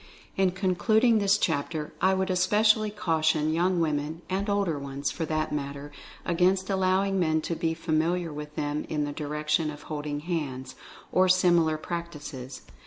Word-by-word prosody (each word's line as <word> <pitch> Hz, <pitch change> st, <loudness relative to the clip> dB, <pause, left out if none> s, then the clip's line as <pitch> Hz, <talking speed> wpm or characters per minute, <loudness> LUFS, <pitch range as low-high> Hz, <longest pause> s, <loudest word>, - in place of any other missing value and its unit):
In 190 Hz, -1 st, +3 dB
concluding 215 Hz, +5 st, +2 dB
this 200 Hz, 0 st, +3 dB
chapter, 155 Hz, -3 st, -2 dB
I 190 Hz, 0 st, +4 dB
would 190 Hz, 0 st, 0 dB
especially 215 Hz, +4 st, +3 dB
cau 180 Hz, -7 st, -1 dB
tion 155 Hz, 0 st, +2 dB
young 175 Hz, +2 st, +2 dB
women 155 Hz, +1 st, -1 dB
and 195 Hz, +2 st, -1 dB
older 200 Hz, -7 st, 0 dB
ones, 140 Hz, 0 st, -3 dB
for 165 Hz, -, -3 dB
that 155 Hz, 0 st, -1 dB
matter, 140 Hz, 0 st, -4 dB, 0.3 s
against 185 Hz, +3 st, +2 dB
allowing 190 Hz, +1 st, +2 dB
men 160 Hz, -2 st, +2 dB
to 165 Hz, -, -3 dB
be 165 Hz, 0 st, -1 dB
familiar 165 Hz, +1 st, 0 dB
with 150 Hz, 0 st, -8 dB
them 145 Hz, 0 st, -2 dB
in 150 Hz, -2 st, -1 dB
the 145 Hz, -, -3 dB
direction 150 Hz, +1 st, -1 dB
of 150 Hz, -1 st, -8 dB
''holding 150 Hz, -1 st, -4 dB
hands," 135 Hz, -7 st, -3 dB, 0.4 s
or 185 Hz, 0 st, +4 dB
similar 175 Hz, -4 st, +4 dB
practices. 150 Hz, -6 st, -6 dB
165 Hz, 160 wpm, -27 LUFS, 150-185 Hz, 0.4 s, I